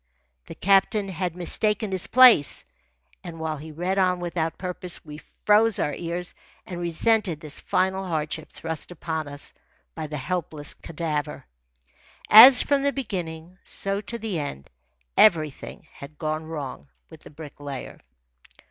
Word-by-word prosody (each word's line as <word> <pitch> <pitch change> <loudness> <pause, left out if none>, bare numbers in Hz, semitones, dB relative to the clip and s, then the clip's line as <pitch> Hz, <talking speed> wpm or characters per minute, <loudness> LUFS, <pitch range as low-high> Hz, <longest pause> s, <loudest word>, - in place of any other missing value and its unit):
The - - -9
captain 195 +1 +2
had 180 -2 -3
mistaken 210 +4 -1
his 185 -2 -1
place, 250 - +6 0.6
and 170 -2 -9
while 160 -1 -3
he 155 +2 -10
read 180 +5 -2
on 180 -1 +2
without 170 -2 -3
purpose 180 -2 -5
we 150 0 -9 0.3
froze 215 +1 +5
our 150 - -1
ears 175 +1 -5 0.3
and 175 -2 -7
resented 175 0 +1
this 150 -1 -4
final 190 +1 0
hardship 155 -1 -3
thrust 160 -2 -6
upon 160 -3 -4
us 145 0 -6 0.4
by 160 -2 -5
the 150 0 -5
helpless 150 +1 -2
cadaver. 155 -2 -4 0.9
As 245 +4 +10
from 285 -1 +1
the 280 0 +1
beginning, 180 -8 -6
so 195 +1 -2
to 235 +3 -6
the 215 -7 -3
end, 70 - -7 0.5
everything 155 -9 +2
had 140 +2 -12
gone 155 +1 -3
wrong 140 - -7 0.2
with - - -12
the - - -13
Bricklayer. 145 -3 -9
170 Hz, 140 wpm, -24 LUFS, 155-195 Hz, 0.9 s, As